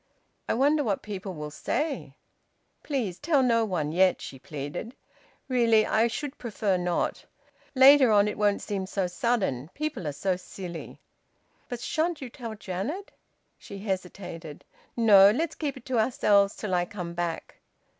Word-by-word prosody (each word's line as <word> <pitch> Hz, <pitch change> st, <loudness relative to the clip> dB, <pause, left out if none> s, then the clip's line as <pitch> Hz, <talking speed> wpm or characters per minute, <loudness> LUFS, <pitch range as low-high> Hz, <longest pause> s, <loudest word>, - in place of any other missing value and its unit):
"I -, -, +2 dB
wonder 290 Hz, +4 st, +3 dB
what 205 Hz, -6 st, -1 dB
people 195 Hz, -3 st, -6 dB
will 150 Hz, -1 st, -6 dB
say!" 295 Hz, -, -3 dB, 0.7 s
"Please 230 Hz, -, -3 dB
tell 290 Hz, -3 st, +2 dB
no 230 Hz, -2 st, +3 dB
one, 165 Hz, -7 st, -2 dB
yet," 185 Hz, +2 st, +3 dB
she 135 Hz, -, -9 dB
pleaded. 155 Hz, -, -6 dB, 0.5 s
"Really, 230 Hz, -4 st, +4 dB
I 225 Hz, +2 st, +3 dB
should 285 Hz, +4 st, -5 dB
prefer 210 Hz, -4 st, -1 dB
not! 180 Hz, -1 st, -1 dB, 0.5 s
Later 265 Hz, -1 st, +8 dB
on, 205 Hz, -1 st, +5 dB
it 210 Hz, -, -2 dB
won't 205 Hz, -1 st, +1 dB
seem 195 Hz, -2 st, -3 dB
so 195 Hz, 0 st, -1 dB
sudden; 180 Hz, -, -1 dB
people 300 Hz, -, -3 dB
are -, -, -1 dB
so 180 Hz, +6 st, -1 dB
silly." 180 Hz, -2 st, -8 dB, 0.7 s
"But 245 Hz, -1 st, -5 dB
shan't 320 Hz, +5 st, -1 dB
you 260 Hz, -3 st, -7 dB
tell 230 Hz, -4 st, -7 dB
Janet?" 215 Hz, -, -5 dB, 0.5 s
She 200 Hz, -, -9 dB
hesitated. 185 Hz, -5 st, -6 dB, 0.3 s
"No! 200 Hz, -4 st, +8 dB
Let's 315 Hz, +9 st, 0 dB
keep 285 Hz, -4 st, -4 dB
it 250 Hz, -, -13 dB
to 255 Hz, -3 st, 0 dB
ourselves 205 Hz, -4 st, +3 dB
till 210 Hz, -4 st, -4 dB
I 175 Hz, -1 st, +2 dB
come 175 Hz, -3 st, -6 dB
back." 170 Hz, -1 st, -4 dB
205 Hz, 155 wpm, -27 LUFS, 180-250 Hz, 0.7 s, Later